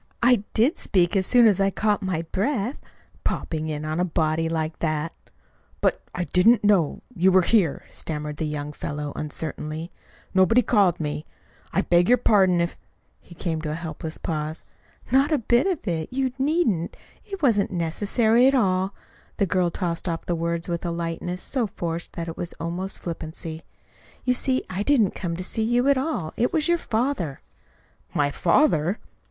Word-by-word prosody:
"I 245 Hz, 0 st, +6 dB, 0.2 s
did 245 Hz, +9 st, +3 dB
speak 175 Hz, -2 st, +2 dB
as 190 Hz, -1 st, +2 dB
soon 245 Hz, -1 st, +6 dB
as 205 Hz, -4 st, +4 dB
I 195 Hz, 0 st, +3 dB
caught 210 Hz, +1 st, 0 dB
my 185 Hz, -4 st, -1 dB
breath; 235 Hz, +4 st, -1 dB, 0.4 s
popping 155 Hz, -1 st, -2 dB
in 155 Hz, -1 st, -3 dB
on 155 Hz, +2 st, -2 dB
a -, -, +3 dB
body 160 Hz, -2 st, 0 dB
like 160 Hz, -1 st, -2 dB
that!" 155 Hz, 0 st, -1 dB, 0.7 s
"But -, -, +1 dB
I 180 Hz, -, -1 dB
didn't 210 Hz, +7 st, +4 dB
know 195 Hz, -8 st, +2 dB
you 190 Hz, -1 st, +3 dB
were 185 Hz, 0 st, +5 dB
here," 180 Hz, -6 st, +2 dB
stammered 150 Hz, -1 st, -5 dB
the 155 Hz, -, -2 dB
young 150 Hz, 0 st, -4 dB
fellow 145 Hz, 0 st, -4 dB
uncertainly. 155 Hz, +2 st, -4 dB, 0.4 s
"Nobody 210 Hz, +6 st, +5 dB
called 195 Hz, -7 st, +3 dB
me. 150 Hz, -1 st, -3 dB, 0.4 s
I 195 Hz, -, +2 dB
beg 175 Hz, 0 st, +3 dB
your 250 Hz, -, +6 dB
pardon 190 Hz, -6 st, +4 dB
if 170 Hz, -, -2 dB, 0.2 s
" -, -, -42 dB
He 170 Hz, -, -15 dB
came 165 Hz, -2 st, -2 dB
to 155 Hz, -, -4 dB
a 150 Hz, -, -2 dB
helpless 160 Hz, -1 st, -6 dB
pause. 155 Hz, -1 st, -4 dB, 0.5 s
"Not 270 Hz, +4 st, +4 dB
a 305 Hz, -, +4 dB
bit 240 Hz, -, +2 dB
of 355 Hz, -, -2 dB
it! 160 Hz, -3 st, -2 dB
You 260 Hz, 0 st, 0 dB
needn't. 265 Hz, -, +1 dB, 0.3 s
It 390 Hz, -5 st, -8 dB
wasn't 215 Hz, -7 st, +3 dB
necessary 215 Hz, +8 st, +2 dB
at 275 Hz, -, +4 dB
all." 190 Hz, -4 st, +1 dB, 0.4 s
The 200 Hz, -, +2 dB
girl 180 Hz, -1 st, +1 dB
tossed 170 Hz, 0 st, -3 dB
off 165 Hz, -1 st, -3 dB
the 175 Hz, -, -1 dB
words 170 Hz, 0 st, -2 dB
with 170 Hz, -1 st, -3 dB
a 175 Hz, -, -1 dB
lightness 170 Hz, +1 st, -3 dB
so 250 Hz, -5 st, -1 dB
forced 170 Hz, -2 st, -4 dB
that 170 Hz, 0 st, -5 dB
it 165 Hz, -, -5 dB
was 175 Hz, -, -4 dB
almost 175 Hz, +3 st, -4 dB
flippancy. 160 Hz, -1 st, -5 dB, 0.6 s
"You 250 Hz, -, +3 dB
see, 260 Hz, +1 st, +1 dB
I 185 Hz, +2 st, -3 dB
didn't 220 Hz, -4 st, +3 dB
come 170 Hz, -2 st, -4 dB
to 185 Hz, -, -4 dB
see 220 Hz, -, -3 dB
you 240 Hz, +4 st, +2 dB
at 280 Hz, -, +4 dB
all. 250 Hz, -, -2 dB
It 245 Hz, -, +2 dB
was 310 Hz, 0 st, +1 dB
your 345 Hz, 0 st, +3 dB
father." 225 Hz, -, -1 dB, 0.7 s
"My 145 Hz, -1 st, +2 dB
father!" 175 Hz, -, +2 dB
180 Hz, 180 wpm, -24 LUFS, 165-225 Hz, 0.7 s, I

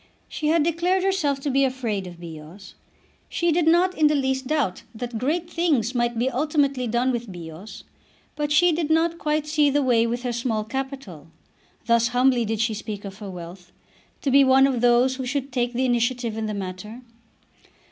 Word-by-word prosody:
She 305 Hz, -, -4 dB
had 320 Hz, 0 st, +3 dB
declared 345 Hz, +3 st, +1 dB
herself 350 Hz, -8 st, 0 dB
to 280 Hz, -, -2 dB
be 275 Hz, +1 st, +3 dB
afraid 235 Hz, -8 st, -2 dB
of 175 Hz, -1 st, -11 dB
Bios. 170 Hz, +3 st, -11 dB, 0.6 s
She 340 Hz, -1 st, 0 dB
did 325 Hz, 0 st, +1 dB
not 355 Hz, +3 st, +4 dB
in 310 Hz, -1 st, +4 dB
the 300 Hz, -, +2 dB
least 265 Hz, -1 st, -1 dB
doubt 285 Hz, -12 st, -1 dB
that 235 Hz, 0 st, -5 dB
great 325 Hz, +7 st, -1 dB
things 305 Hz, -10 st, 0 dB
might 240 Hz, -1 st, 0 dB
be 240 Hz, +3 st, +1 dB
ultimately 275 Hz, -1 st, 0 dB
done 240 Hz, +3 st, +1 dB
with 240 Hz, -4 st, -4 dB
Bios, 170 Hz, +3 st, -10 dB, 0.5 s
but 295 Hz, -1 st, -2 dB
she 345 Hz, +4 st, +5 dB
did 320 Hz, -1 st, -1 dB
not 330 Hz, +1 st, +1 dB
quite 300 Hz, 0 st, 0 dB
see 300 Hz, -1 st, +2 dB
the 285 Hz, +1 st, +1 dB
way 235 Hz, -3 st, +3 dB
with 240 Hz, +1 st, -3 dB
her 245 Hz, -1 st, -2 dB
small 230 Hz, -2 st, -1 dB
capital, 265 Hz, -, -6 dB, 0.6 s
thus 235 Hz, 0 st, +3 dB
humbly 245 Hz, 0 st, +2 dB
did 220 Hz, 0 st, -2 dB
she 225 Hz, 0 st, +1 dB
speak 210 Hz, -1 st, -6 dB
of 195 Hz, +1 st, -9 dB
her 205 Hz, -2 st, -7 dB
wealth, 180 Hz, 0 st, -10 dB, 0.5 s
to 275 Hz, -, 0 dB
be 275 Hz, +1 st, +6 dB
one 265 Hz, 0 st, +5 dB
of 260 Hz, -4 st, 0 dB
those 245 Hz, +2 st, +3 dB
who 260 Hz, -, -4 dB
should 275 Hz, +1 st, -3 dB
take 245 Hz, -1 st, -1 dB
the 255 Hz, +2 st, 0 dB
initiative 240 Hz, -1 st, 0 dB
in 220 Hz, -1 st, -3 dB
the 210 Hz, -, -3 dB
matter. 200 Hz, +5 st, -7 dB
255 Hz, 195 wpm, -24 LUFS, 220-295 Hz, 0.6 s, be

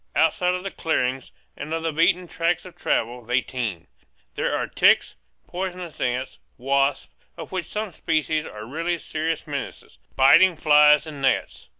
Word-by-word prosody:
Outside 180 Hz, +3 st, +2 dB
of 180 Hz, -, -5 dB
the 195 Hz, -, -5 dB
clearings, 130 Hz, -7 st, -2 dB, 0.2 s
and 150 Hz, -, -7 dB
of 165 Hz, -, -4 dB
the 165 Hz, -, 0 dB
beaten 175 Hz, +3 st, +2 dB
tracks 170 Hz, +2 st, -1 dB
of 180 Hz, -, -12 dB
travel, 120 Hz, +2 st, -1 dB
they 125 Hz, +3 st, +1 dB
teem. 120 Hz, -9 st, -5 dB, 0.5 s
There -, -, -1 dB
are -, -, -1 dB
ticks, -, -, +3 dB, 0.3 s
poisonous 180 Hz, -3 st, -6 dB
ants, 125 Hz, +1 st, -2 dB, 0.2 s
wasps 135 Hz, +2 st, 0 dB, 0.3 s
of 165 Hz, -, -8 dB
which 185 Hz, -2 st, -3 dB
some 215 Hz, -1 st, -4 dB
species 155 Hz, -1 st, -1 dB
are 105 Hz, 0 st, -9 dB
really 165 Hz, +7 st, -2 dB
serious 160 Hz, 0 st, -3 dB
menaces 140 Hz, -, -7 dB, 0.2 s
biting 165 Hz, +7 st, +6 dB
flies 150 Hz, -1 st, +5 dB
and 150 Hz, -3 st, -9 dB
gnats. 135 Hz, -, -1 dB
155 Hz, 160 wpm, -23 LUFS, 130-170 Hz, 0.5 s, biting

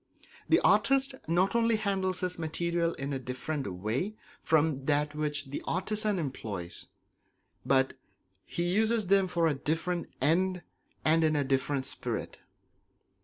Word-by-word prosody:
The -, -, +6 dB
artist 270 Hz, 0 st, +3 dB
not 180 Hz, +4 st, +2 dB
only 230 Hz, -1 st, +3 dB
handles 195 Hz, -3 st, -1 dB
his 180 Hz, -1 st, -2 dB
materials 170 Hz, +1 st, 0 dB
in 140 Hz, +1 st, -3 dB
a 135 Hz, -, -2 dB
different 130 Hz, -1 st, -4 dB
way 110 Hz, -, -2 dB, 0.3 s
from 160 Hz, -2 st, +2 dB
that 145 Hz, 0 st, +2 dB
which 150 Hz, -2 st, -2 dB
the -, -, -3 dB
artisan 210 Hz, +3 st, 0 dB
employs, 105 Hz, -, -5 dB, 0.8 s
but 135 Hz, -1 st, +3 dB, 0.5 s
he 170 Hz, -, -3 dB
uses 215 Hz, +5 st, +2 dB
them 195 Hz, 0 st, +4 dB
for 170 Hz, -2 st, +1 dB
a 160 Hz, -, +3 dB
different 165 Hz, +5 st, -2 dB
end 180 Hz, +6 st, +2 dB, 0.4 s
and 160 Hz, +1 st, +4 dB
in 155 Hz, -1 st, +3 dB
a 145 Hz, -, +2 dB
different 135 Hz, 0 st, 0 dB
spirit. -, -, -3 dB
165 Hz, 135 wpm, -30 LUFS, 140-185 Hz, 0.8 s, The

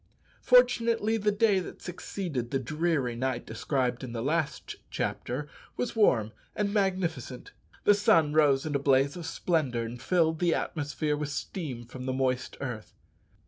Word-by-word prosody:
Fortunately 235 Hz, -3 st, +4 dB
the 210 Hz, -1 st, +1 dB
day 205 Hz, -1 st, +3 dB
that 180 Hz, -, -7 dB
succeeded 170 Hz, -8 st, -4 dB
the 135 Hz, -, 0 dB
dreary 150 Hz, -2 st, -1 dB
night 130 Hz, 0 st, -2 dB
described 125 Hz, +2 st, -1 dB
in 120 Hz, -3 st, -6 dB
the 115 Hz, -1 st, -3 dB
last 150 Hz, +1 st, -2 dB
chapter 140 Hz, +4 st, -3 dB, 0.3 s
was 245 Hz, -, -2 dB
warm 115 Hz, -, +3 dB, 0.2 s
and 205 Hz, -1 st, -1 dB
magnificent. 180 Hz, -, -1 dB, 0.3 s
The 205 Hz, -, +6 dB
sun 165 Hz, -7 st, +3 dB
rose 145 Hz, -2 st, +4 dB
in 155 Hz, -, -2 dB
a 140 Hz, -, +2 dB
blaze 140 Hz, 0 st, +3 dB
of 170 Hz, -2 st, -6 dB
splendour, 140 Hz, -12 st, 0 dB
and 115 Hz, +1 st, -7 dB
filled 160 Hz, -3 st, +2 dB
the 175 Hz, -2 st, +2 dB
atmosphere 150 Hz, 0 st, -2 dB
with 145 Hz, -1 st, -3 dB
steam 145 Hz, -4 st, -5 dB
from 125 Hz, +2 st, -8 dB
the 130 Hz, -, 0 dB
moist 130 Hz, -1 st, -1 dB
earth. 120 Hz, -6 st, -6 dB
150 Hz, 155 wpm, -29 LUFS, 130-180 Hz, 0.3 s, The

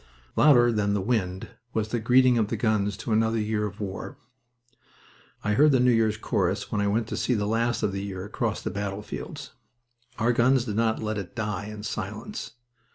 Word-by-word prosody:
Louder 120 Hz, -5 st, +6 dB
than 100 Hz, -2 st, +1 dB
the -, -, +1 dB
wind 95 Hz, -3 st, -1 dB, 0.3 s
was 110 Hz, -1 st, 0 dB
the 120 Hz, -, -1 dB
greeting 125 Hz, +1 st, +4 dB
of 110 Hz, -, +1 dB
the 115 Hz, -, -3 dB
guns 105 Hz, -3 st, +1 dB
to 115 Hz, -, -5 dB
another 110 Hz, +1 st, +2 dB
year 105 Hz, 0 st, 0 dB
of 100 Hz, 0 st, -10 dB
war. 100 Hz, +6 st, -5 dB, 1.3 s
I 105 Hz, -, +1 dB
heard 150 Hz, +7 st, +5 dB
the 130 Hz, -, +4 dB
New 125 Hz, 0 st, +4 dB
Year's 110 Hz, -2 st, +2 dB
chorus 100 Hz, -2 st, -1 dB
when 105 Hz, -, 0 dB
I 100 Hz, -, +1 dB
went 110 Hz, +3 st, +1 dB
to -, -, -3 dB
see 125 Hz, -, 0 dB
the 105 Hz, -2 st, 0 dB
last 115 Hz, +2 st, 0 dB
of 100 Hz, -, +1 dB
the 100 Hz, 0 st, -3 dB
year 95 Hz, -1 st, -5 dB
across 105 Hz, -, -2 dB
the -, -, -2 dB
battlefields. 100 Hz, +1 st, -5 dB, 0.7 s
Our 120 Hz, +2 st, +2 dB
guns 125 Hz, +1 st, +3 dB
did 105 Hz, -4 st, -3 dB
not 110 Hz, 0 st, +1 dB
let 110 Hz, -1 st, -2 dB
it 90 Hz, -4 st, -8 dB
die 105 Hz, -4 st, -3 dB
in 105 Hz, 0 st, -8 dB
silence. 110 Hz, -, -5 dB
110 Hz, 200 wpm, -26 LUFS, 100-115 Hz, 1.3 s, Louder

